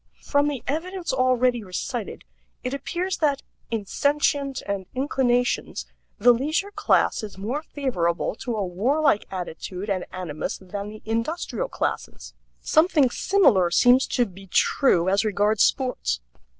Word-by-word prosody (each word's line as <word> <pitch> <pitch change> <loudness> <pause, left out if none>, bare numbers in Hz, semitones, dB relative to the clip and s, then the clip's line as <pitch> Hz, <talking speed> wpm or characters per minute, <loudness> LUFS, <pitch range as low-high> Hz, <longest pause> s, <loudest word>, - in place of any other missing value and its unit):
From 285 0 +2
the 285 -4 -3
evidence 345 +4 -3
already 255 -2 +2
recited 205 +4 -5 0.4
it 255 +1 -3
appears 350 +7 -2
that, 285 -3 +1 0.3
in 225 -3 -2
sentient 285 +2 0
and 195 -2 -3
inclinations, 245 - 0 0.3
the 245 +4 +6
leisure 310 - -1
class - - +2
is 210 -3 -8
more 235 +10 -3
favorable 185 - -1
to 240 -2 -3
a 205 -2 -1
warlike 240 - +1
attitude 185 +2 -5
and 185 -2 -2
animus 175 -5 -4
than 200 +2 -6
the 215 0 -11
industrial 305 - -2
classes. - - -4 0.3
Something 310 -5 +3
similar 230 - +3
seems 245 +8 +5
to 245 - +1
be 195 -1 -13
true 180 -1 +3
as 195 +3 +3
regards 210 0 +1
sports. 250 - 0
245 Hz, 135 wpm, -24 LUFS, 195-285 Hz, 0.4 s, the